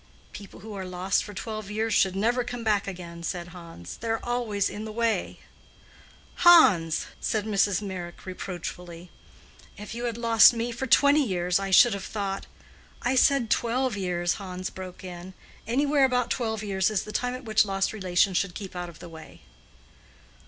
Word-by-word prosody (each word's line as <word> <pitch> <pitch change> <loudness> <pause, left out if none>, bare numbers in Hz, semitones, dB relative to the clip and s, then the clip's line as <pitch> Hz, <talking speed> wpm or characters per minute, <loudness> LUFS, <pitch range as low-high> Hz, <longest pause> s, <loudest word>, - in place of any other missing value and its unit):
"People 200 -1 -11
who 215 +1 -9
are 195 -1 -5
lost 185 +1 -1
for - - -9
twelve 215 +1 -6
years 220 +1 -1
should 190 -1 +3
never 235 +5 +1
come 245 -1 -6
back 210 -3 +1
again," 175 -3 -7
said 175 +1 -4
Hans. 165 - -10
"They 230 - -7
are 225 0 0
always 235 -5 -1
in 210 - -6
the 220 - -6
way." 230 0 -1 1.0
"Hans!" 190 - +6
said 215 -2 -1
Mrs. 205 -1 +1
Meyrick, 180 -3 -7
reproachfully. 180 -2 -7 0.7
"If 210 +1 -8
you 240 +1 -4
had 235 -1 -3
lost 230 -1 +6
me 235 +1 -2
for 250 +3 -4
twenty 285 +4 +5
years, 180 -4 0
I 195 0 -3
should 210 +4 +6
have 200 -1 -5
thought—" 195 -2 -4 0.6
"I 245 +2 +1
said 260 -3 +3
twelve 245 0 +1
years," 175 -3 -1
Hans 185 -1 -5
broke 185 -1 -9
in. 180 0 -9 0.3
"Anywhere 280 +3 +3
about 250 -2 0
twelve 220 -3 -2
years 190 -2 +1
is 215 -4 -1
the 215 - -8
time 250 +3 -1
at 255 0 -9
which 215 -1 +4
lost 195 -1 -1
relations 185 -2 +1
should 190 -3 -1
keep 195 -3 -8
out 175 -1 -4
of 165 - -13
the 175 - -11
way." 160 -2 -13
200 Hz, 180 wpm, -26 LUFS, 180-230 Hz, 1.0 s, Hans